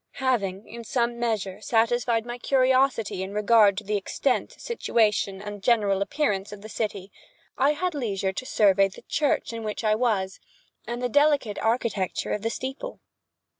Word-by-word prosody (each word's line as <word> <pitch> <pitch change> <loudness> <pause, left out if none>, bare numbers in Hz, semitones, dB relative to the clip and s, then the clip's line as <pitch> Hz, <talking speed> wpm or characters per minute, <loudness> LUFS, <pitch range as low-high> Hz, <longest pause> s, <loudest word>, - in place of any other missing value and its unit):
Having, 215 -7 -1
in 235 +2 -9
some 235 +1 -1
measure, 215 -5 -2
satisfied 230 0 +1
my 240 0 -6
curiosity 260 -6 +2
in 190 +2 -5
regard 210 -2 +5
to 215 - -3
the 210 +1 -1
extent, 250 +6 -1
situation, 210 - 0
and 205 0 -7
general 205 -4 +2
appearance 200 -5 -1
of 205 -1 -10
the 215 - -9
city, 205 -3 -4 0.4
I 280 +2 +3
had 355 +4 -2
leisure 200 -8 -2
to 255 - -5
survey 195 -2 +4
the 195 - -14
church 290 -5 0
in 230 -1 -5
which 215 +1 -4
I 215 -1 +3
was, 215 -5 0 0.5
and 240 +1 -4
the - - +2
delicate 285 -5 +2
architecture 225 -4 -1
of 210 - -2
the 225 - -1
steeple. 265 - -5
225 Hz, 165 wpm, -25 LUFS, 200-250 Hz, 0.5 s, regard